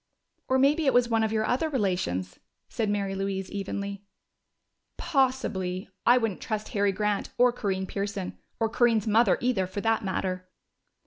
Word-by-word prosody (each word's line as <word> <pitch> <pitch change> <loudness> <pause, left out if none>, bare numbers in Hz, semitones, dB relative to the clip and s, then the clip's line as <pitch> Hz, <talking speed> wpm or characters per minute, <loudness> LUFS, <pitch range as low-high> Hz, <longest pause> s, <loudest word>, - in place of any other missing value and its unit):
"Or 260 - +3
maybe 285 +3 +3
it 265 - +3
was 245 -1 +4
one 225 -1 +2
of 220 - 0
your 220 0 +1
other 265 +8 +1
relations," 180 - -1 0.3
said 220 -3 -2
Mary 200 -1 -1
Louise 195 -1 -3
evenly. 200 0 -4 0.9
"Possibly. 250 - 0 0.2
I 245 +1 +7
wouldn't 225 -6 -1
trust 215 -1 -3
Harry 205 -1 +1
Grant 210 +1 -1
or 245 0 +5
Corinne 190 -5 -2
Pearson. 200 -1 -4 0.2
Or 225 - +2
Corinne's 230 -1 +2
mother, 220 -1 +4
either, 240 -7 +1
for 200 +2 -5
that 225 0 +1
matter!" 185 -1 -3
205 Hz, 155 wpm, -27 LUFS, 195-240 Hz, 0.9 s, I